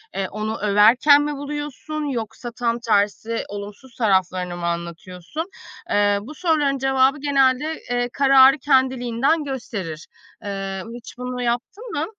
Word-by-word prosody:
eee, 195 Hz, -1 st, -1 dB
onu 215 Hz, +2 st, -4 dB
överken 225 Hz, +8 st, +5 dB
mi 295 Hz, 0 st, -2 dB
buluyorsun 295 Hz, +1 st, -5 dB
yoksa 235 Hz, -1 st, -5 dB
tam 235 Hz, +1 st, -1 dB
tersi 220 Hz, 0 st, 0 dB
olumsuz 205 Hz, +5 st, -9 dB
taraflarını 185 Hz, -5 st, 0 dB
mı 175 Hz, -, -4 dB
anlatıyorsun? 170 Hz, -, -5 dB, 0.5 s
Iıı, 205 Hz, 0 st, +3 dB
bu 275 Hz, +9 st, -10 dB
soruların 300 Hz, -6 st, +1 dB
cevabı 270 Hz, +1 st, +2 dB
genelde, 280 Hz, +2 st, +1 dB
eee, 245 Hz, 0 st, 0 dB
kararı 270 Hz, 0 st, +6 dB
kendiliğinden 260 Hz, +2 st, +2 dB
gösterir. 200 Hz, -, -6 dB, 0.4 s
Iıı, 195 Hz, -1 st, -4 dB
hiç 240 Hz, 0 st, -11 dB
bunu 250 Hz, 0 st, -4 dB
yaptın 245 Hz, -, -3 dB
mı? 300 Hz, -, -1 dB
245 Hz, 130 wpm, -22 LUFS, 205-275 Hz, 0.5 s, kararı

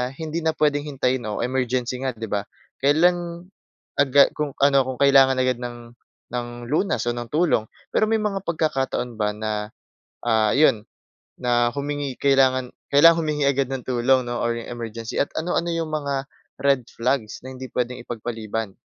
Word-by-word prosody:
hindi 160 Hz, +2 st, -4 dB
na 160 Hz, 0 st, +1 dB
puwedeng 145 Hz, -1 st, +1 dB
hintayin 130 Hz, -3 st, 0 dB
o 105 Hz, -, -3 dB
emergency 125 Hz, 0 st, -1 dB
nga, 130 Hz, -, -1 dB
'di 115 Hz, 0 st, -6 dB
ba. 100 Hz, 0 st, -1 dB, 0.4 s
Kailan, 170 Hz, +4 st, +2 dB, 0.5 s
agad 140 Hz, 0 st, +5 dB
kung 150 Hz, -1 st, -2 dB
ano, 140 Hz, -1 st, +5 dB
kung 130 Hz, -1 st, -5 dB
kailangan 135 Hz, -1 st, +5 dB
agad 130 Hz, -1 st, +1 dB
ng 120 Hz, -1 st, -8 dB, 0.4 s
ng 120 Hz, -1 st, -2 dB, 0.2 s
lunas 150 Hz, -, 0 dB
o 120 Hz, -, +1 dB
ng 120 Hz, -1 st, -6 dB
tulong. 155 Hz, -7 st, +2 dB, 0.3 s
Pero 215 Hz, -, +2 dB
may 225 Hz, -, +3 dB
mga 205 Hz, -2 st, -1 dB
pagkakataon 135 Hz, -8 st, -1 dB
ba 105 Hz, -1 st, 0 dB
na, 105 Hz, 0 st, -3 dB, 0.6 s
ah, 110 Hz, -2 st, +3 dB
'yon, 135 Hz, -7 st, +4 dB, 0.5 s
na 120 Hz, -1 st, +2 dB
humingi 145 Hz, -1 st, -3 dB
kailangan 130 Hz, -2 st, +3 dB, 0.2 s
kailangan 165 Hz, +3 st, +7 dB
humingi 150 Hz, -2 st, -1 dB
agad 140 Hz, -1 st, +2 dB
ng 135 Hz, -1 st, -3 dB
tulong 130 Hz, +1 st, +2 dB
'no, 120 Hz, 0 st, -3 dB
or 120 Hz, 0 st, 0 dB
'yong 115 Hz, -, -7 dB
emergency 115 Hz, -1 st, -5 dB
at 140 Hz, -, +1 dB
ano-ano 170 Hz, +1 st, -1 dB
'yong 165 Hz, -1 st, -2 dB
mga 145 Hz, -2 st, -1 dB, 0.5 s
red 135 Hz, -4 st, +2 dB
flags 120 Hz, -2 st, -2 dB
na 130 Hz, -, -7 dB
hindi 130 Hz, 0 st, -7 dB
puwedeng 125 Hz, +1 st, -2 dB
ipagpaliban? 110 Hz, -2 st, -4 dB
130 Hz, 165 wpm, -23 LUFS, 120-145 Hz, 0.6 s, kailangan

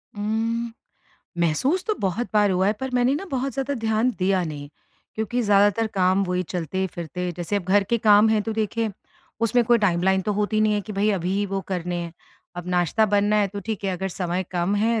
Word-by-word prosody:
उम, 225 Hz, +3 st, -1 dB, 0.7 s
महसूस 215 Hz, -, +1 dB
तो 430 Hz, -, 0 dB
बहुत 200 Hz, +5 st, -1 dB
बार 205 Hz, -1 st, +4 dB
हुआ 185 Hz, +1 st, +2 dB
है 210 Hz, -, +3 dB
पर 265 Hz, 0 st, -3 dB
मैंने 250 Hz, +2 st, +3 dB
ना 320 Hz, -, -3 dB
बहुत 270 Hz, 0 st, -1 dB
ज़्यादा 275 Hz, +1 st, -2 dB
ध्यान 225 Hz, +1 st, +1 dB
दिया 185 Hz, 0 st, +2 dB
नहीं, 145 Hz, -2 st, -6 dB, 0.5 s
क्योंकि 220 Hz, +3 st, -1 dB
ज़्यादातर 205 Hz, +2 st, +3 dB
काम 185 Hz, +1 st, +3 dB
वही 180 Hz, 0 st, -1 dB
चलते-फिरते 180 Hz, 0 st, -4 dB
जैसे 175 Hz, +4 st, -2 dB
अब 200 Hz, -, -1 dB
घर 195 Hz, +2 st, +3 dB
के 235 Hz, -, +3 dB
काम 210 Hz, 0 st, +5 dB
हैं, 215 Hz, -1 st, +2 dB
तो 225 Hz, -, -3 dB
देखें 220 Hz, +1 st, -1 dB, 0.5 s
उसमें 235 Hz, +1 st, +3 dB
कोई 240 Hz, 0 st, +4 dB
टाइमलाइन 190 Hz, -1 st, +2 dB
तो 210 Hz, -, -1 dB
होती 210 Hz, +1 st, 0 dB
नहीं 215 Hz, 0 st, +3 dB
है 205 Hz, -, 0 dB
कि 210 Hz, +1 st, -8 dB
भई 205 Hz, +2 st, +1 dB
अभी 195 Hz, +2 st, 0 dB
वो 195 Hz, 0 st, -2 dB
करने 180 Hz, -1 st, -2 dB
हैं। 170 Hz, -1 st, -5 dB, 0.4 s
अब 175 Hz, 0 st, -6 dB
नाश्ता 180 Hz, +5 st, +2 dB
बनना 205 Hz, +1 st, +2 dB
है 205 Hz, -1 st, +3 dB
तो 200 Hz, +1 st, -6 dB
ठीक 215 Hz, -2 st, -4 dB
है, 190 Hz, -, 0 dB
अगर 190 Hz, +2 st, -3 dB
समय 180 Hz, 0 st, -2 dB
कम 180 Hz, +2 st, 0 dB
है 225 Hz, +2 st, +1 dB
205 Hz, 210 wpm, -24 LUFS, 185-220 Hz, 0.7 s, काम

